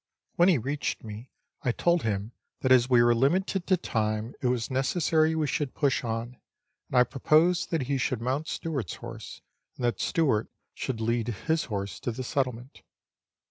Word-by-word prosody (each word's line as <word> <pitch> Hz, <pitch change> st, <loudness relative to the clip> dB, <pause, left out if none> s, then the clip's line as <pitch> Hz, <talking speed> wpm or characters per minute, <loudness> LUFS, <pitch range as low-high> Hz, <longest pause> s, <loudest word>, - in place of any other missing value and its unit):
When 175 Hz, +2 st, +5 dB
he 175 Hz, -, +5 dB
reached 140 Hz, +5 st, -3 dB
me, 110 Hz, +3 st, -8 dB, 0.3 s
I 125 Hz, -, +1 dB
told 170 Hz, +7 st, +2 dB
him 105 Hz, 0 st, -2 dB, 0.3 s
that 130 Hz, -, +1 dB
as 125 Hz, -1 st, +6 dB
we 120 Hz, -2 st, +6 dB
were 120 Hz, 0 st, +5 dB
limited 175 Hz, +9 st, +1 dB
to 185 Hz, -, +4 dB
time, 110 Hz, -4 st, -2 dB
it 130 Hz, -, +1 dB
was 125 Hz, -2 st, -1 dB
necessary 155 Hz, +4 st, +2 dB
we 155 Hz, -1 st, +1 dB
should 145 Hz, -1 st, -2 dB
push 140 Hz, -3 st, +1 dB
on, 115 Hz, +1 st, -4 dB, 0.5 s
and 130 Hz, -, 0 dB
I 125 Hz, -, +8 dB
proposed 155 Hz, +7 st, +2 dB
that 160 Hz, -5 st, 0 dB
he 135 Hz, +1 st, -1 dB
should 125 Hz, -1 st, 0 dB
mount 130 Hz, +6 st, -2 dB
Stewart's 135 Hz, -, -3 dB
horse, 115 Hz, -2 st, -9 dB, 0.3 s
and 125 Hz, -, -3 dB
that 120 Hz, -5 st, 0 dB
Stewart 135 Hz, -10 st, +1 dB, 0.2 s
should 115 Hz, -4 st, -4 dB
lead 115 Hz, 0 st, 0 dB
his 160 Hz, +9 st, -1 dB
horse 100 Hz, -4 st, -4 dB
to 120 Hz, -, -2 dB
the 130 Hz, +3 st, -5 dB
settlement. 125 Hz, -1 st, -3 dB
130 Hz, 180 wpm, -28 LUFS, 115-155 Hz, 0.5 s, I